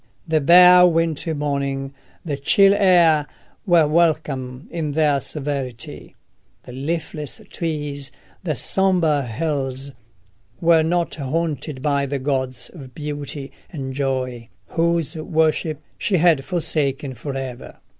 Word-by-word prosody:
The 160 -1 +2
bare 180 +3 +8
wintry 165 -1 0
morning, 140 -2 -2 0.3
the 150 -4 -2
chill 195 +8 +4
air, 175 -7 +4 0.4
were 170 -4 +5
welcome 150 -5 0
in 160 -4 -3
their 150 -2 +2
severity: 135 -5 -5 0.5
the - - -11
leafless 150 - -3
trees, 145 -4 -3 0.3
the 155 -5 -1
sombre 175 -4 +2
hills, 135 +1 -2 0.7
were 165 -1 +4
not 170 +2 0
haunted 145 -1 -3
by 140 -2 +1
the 140 +1 -2
gods 130 -2 -2
of 135 -8 -12
beauty 145 -2 -5 0.2
and 135 -6 -6
joy, 130 -4 -3 0.2
whose 170 -1 0
worship 155 -1 0 0.2
she 190 - +1
had 165 -4 +4
forsaken 150 -5 -1
for 135 +4 -6
ever. 130 -2 -7
150 Hz, 115 wpm, -21 LUFS, 135-165 Hz, 0.7 s, bare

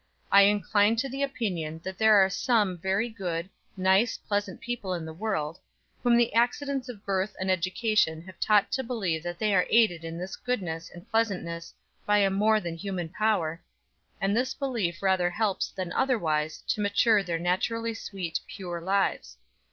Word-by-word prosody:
I 200 - +8
incline 205 +1 +3
to 240 +4 -1
the 270 +1 -5
opinion 180 - -2
that 190 0 -6
there 220 -1 +6
are 195 -2 +6
some 205 -2 +1
very 190 +6 0
good, 180 -6 -4 0.3
nice, 190 +5 +3
pleasant 205 -2 -3
people 225 -6 -3
in 165 -2 -5
the 160 - -7
world, 165 -4 -3 0.4
whom 240 -1 +4
the 235 -2 +2
accidents 255 +3 0
of 215 -5 -9
birth 195 +1 -1
and 190 0 0
education 185 -2 +1
have 185 -1 -13
taught 210 -2 +3
to 265 - -1
believe 200 -10 -2
that 175 +1 -5
they 215 0 +1
are 180 -2 +3
aided 215 -8 +3
in 165 0 -6
this 180 +2 -5
goodness 180 -10 -3
and 175 +4 -13
pleasantness 180 -7 -1 0.3
by 210 0 +3
a 200 -1 +3
more 215 +3 +3
than 170 -4 -5
human 185 -3 -4
power, 180 -5 0 0.6
and 195 +1 +1
this 255 +2 0
belief 215 -11 -2
rather 190 -2 +3
helps 200 +2 -1
than 185 -2 -5
otherwise 160 - 0
to 215 - +1
mature 205 +1 +3
their 175 -3 -2
naturally 225 +7 -1
sweet, 190 -6 -4
pure 175 -3 -6
lives. 195 - 0
195 Hz, 175 wpm, -27 LUFS, 175-220 Hz, 0.6 s, I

